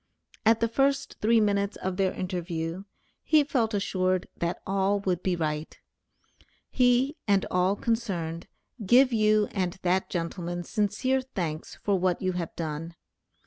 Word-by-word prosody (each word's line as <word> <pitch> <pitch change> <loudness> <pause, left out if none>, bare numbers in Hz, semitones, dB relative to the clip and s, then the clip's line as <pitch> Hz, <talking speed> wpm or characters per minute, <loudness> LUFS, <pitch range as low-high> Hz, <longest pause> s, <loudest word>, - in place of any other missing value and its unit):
At 225 0 +5
the 230 - +3
first 275 +3 0
three 225 +2 +4
minutes 200 -1 +1
of 185 -1 -3
their 190 -1 +2
interview, 175 -1 -4 0.4
he 310 -2 +4
felt 235 -6 0
assured 185 -2 0
that 170 +1 -2
all 195 +1 +1
would 185 -3 -1
be 185 -1 0
right. 155 -2 -3 0.9
He, 255 +4 +3
and 200 -2 +3
all 180 +2 +2
concerned, 185 -8 -2 0.4
give 250 +5 +5
you 215 -1 +3
and 185 -3 -1
that 185 +1 +1
gentleman 175 0 -3
sincere 215 +8 0
thanks 170 -11 -5
for 200 -2 +2
what 180 -1 +1
you 185 -1 0
have 175 -3 -4
done. 165 +1 -5
190 Hz, 145 wpm, -27 LUFS, 175-225 Hz, 0.9 s, At